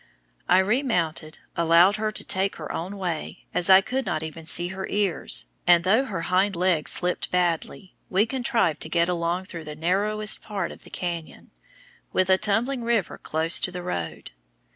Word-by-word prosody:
I 180 - +6
remounted, 190 - 0 0.2
allowed 170 +4 +4
her 215 0 -1
to - - 0
take 190 +1 +2
her 155 - -7
own 190 +5 -5
way, 175 -5 -5
as 180 - +2
I 190 0 +9
could 260 +6 -2
not 155 - -2 0.3
see 175 +2 +3
even 185 +2 -5
her 190 0 -5
ears, 200 -4 -1 0.2
and 175 -1 +6
though 220 +9 +3
her 190 -9 -4
hind 185 +3 +1
legs 175 -3 +1
slipped 180 0 -1
badly, 180 +1 -1 0.2
we 195 +3 +3
contrived 230 - 0
to 160 - -4
get 170 +1 +2
along 175 +1 -1
through 170 -4 -8
the 150 0 -7
narrowest 205 +6 +1
part 200 -5 -4
of - - -14
the - - -13
canyon, 170 -3 -6 0.6
with 185 0 +1
a 190 - +4
tumbling 240 +6 +1
river 230 -5 -1
close 160 +2 +1
to - - -1
the 180 0 -6
road. 85 - -5
185 Hz, 180 wpm, -25 LUFS, 170-205 Hz, 0.6 s, I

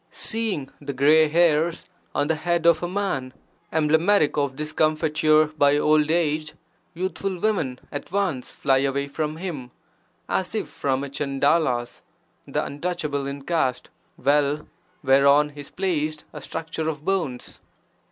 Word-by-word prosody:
Seeing 215 - -3
the 140 -1 -5
grey 150 +4 +5
hairs 165 +1 +2 0.3
on - - +2
the 160 - +2
head 170 +1 -1
of 170 -2 +5
a 175 - -1
man, 175 -9 -2 0.4
emblematic 160 +2 +3
of 140 -2 0
discomfiture 155 +1 +2
by 145 -1 +4
old 150 0 +3
age, 155 -2 0 0.4
youthful 185 +1 -3
women 175 -11 0
at 145 - -6
once 185 -10 -1
fly 135 -1 +1
away 140 +1 0
from 155 +2 -3
him, 160 -9 -5 0.6
as - - -1
if - - -2
from 135 -1 -2
a - - -4
Chandala's 140 -2 0 0.5
(the - - -1
untouchable 145 -2 -3
in 140 0 -6
caste) 135 -6 -1 0.3
well 145 +2 +1 0.4
whereon 140 +2 +5
is 145 -1 -10
placed 155 -5 -2
a - - -8
structure 160 0 -4
of 150 -1 -6
bones! 165 -11 -2
150 Hz, 135 wpm, -24 LUFS, 140-165 Hz, 0.6 s, grey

